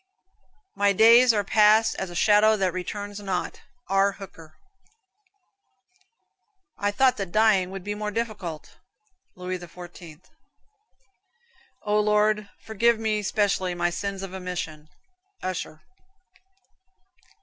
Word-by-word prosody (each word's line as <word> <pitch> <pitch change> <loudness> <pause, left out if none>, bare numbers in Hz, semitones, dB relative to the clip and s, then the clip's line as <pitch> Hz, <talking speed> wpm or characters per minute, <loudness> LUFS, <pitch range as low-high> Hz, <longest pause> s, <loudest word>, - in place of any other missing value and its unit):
"My 200 0 +2
days 235 +4 +7
are 210 -2 0
past 215 +2 +4
as 190 - -4
a 175 - -10
shadow 215 +3 +4
that 190 -3 0
returns 205 +3 -6
not." 190 -3 -4 0.3
R. 195 +1 +2
Hooker. 165 -6 -13 2.2
"I 205 - -1
thought 255 +5 +2
that 195 -3 -5
dying 210 -4 +3
had 195 -1 -7
been 205 +1 -5
more 210 0 -2
difficult," 205 -8 -5 0.6
Louis 180 0 -5
XIV. 175 -2 -12 1.6
"O 210 0 +1
Lord, 210 0 +1
forgive 230 +2 +1
me 215 -1 -1
specially 195 -3 0
my 175 0 0
sins 195 +2 -4
of 190 -1 -7
omission." 175 -5 -6 0.5
Usher. 175 -4 -5
200 Hz, 110 wpm, -25 LUFS, 180-210 Hz, 2.2 s, days